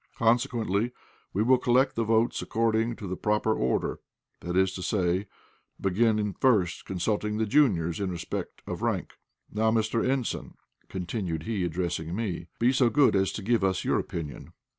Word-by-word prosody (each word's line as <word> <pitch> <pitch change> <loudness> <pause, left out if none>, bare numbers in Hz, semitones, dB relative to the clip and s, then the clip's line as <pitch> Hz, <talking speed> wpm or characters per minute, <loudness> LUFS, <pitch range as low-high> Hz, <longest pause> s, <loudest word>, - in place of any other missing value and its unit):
Consequently 115 -1 +1 0.4
we 105 - +1
will 130 +2 +4
collect 130 +2 +3
the 115 - +1
votes 115 +2 +2
according 115 +1 +1
to 105 - -8
the 95 -1 -3
proper 105 +2 +1
order, 65 - -1 0.4
that 90 +1 -3
is 95 0 +3
to 95 - -6
say, 95 0 0 0.5
begin 105 +1 +1
first 105 -10 +2
consulting 105 +3 -1
the 110 - +1
juniors 100 - +2
in 100 -2 -1
respect 85 -2 -5
of - - -5
rank. - - -2 0.3
Now, 110 +1 +2
Mr. 110 0 +1
Ensign," 130 -2 -2 0.3
continued 90 -3 -3
he, 105 -4 -2
addressing 85 -1 -2
me, 95 -6 -3
"be 120 +3 +3
so 130 -2 +4
good 140 -3 +4
as 95 0 +2
to 105 - -5
give 115 0 +2
us 95 -1 +1
your - - +2
opinion." 75 -4 -6
105 Hz, 160 wpm, -28 LUFS, 90-115 Hz, 0.5 s, will